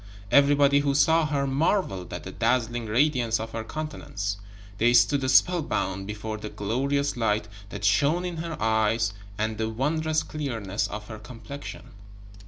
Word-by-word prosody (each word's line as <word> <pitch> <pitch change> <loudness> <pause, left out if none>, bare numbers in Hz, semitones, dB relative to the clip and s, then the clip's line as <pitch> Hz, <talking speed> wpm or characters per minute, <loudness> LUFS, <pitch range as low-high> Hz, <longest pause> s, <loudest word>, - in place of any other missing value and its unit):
Everybody 140 0 +5
who 140 -1 0
saw 160 +2 +4
her 140 -2 0
marveled 135 - 0
at - - -6
the - - -7
dazzling 120 -2 0
radiance 120 -1 +2
of 110 0 -5
her 115 0 -4
countenance; 110 -8 -4 0.4
they 120 +2 +4
stood 130 +3 +4
spellbound 120 - +2
before 110 +1 -5
the 105 0 -6
glorious 140 +8 -1
light 110 -2 0 0.2
that 100 - -5
shone 145 - +3
in 175 -2 -4
her 165 -1 -5
eyes 110 0 +1 0.2
and 110 0 -2
the 110 0 0
wondrous 155 +6 0
clearness 115 -10 -3
of 105 0 -7
her 110 -2 -8
complexion. 115 -4 -9
120 Hz, 150 wpm, -26 LUFS, 110-145 Hz, 0.4 s, Everybody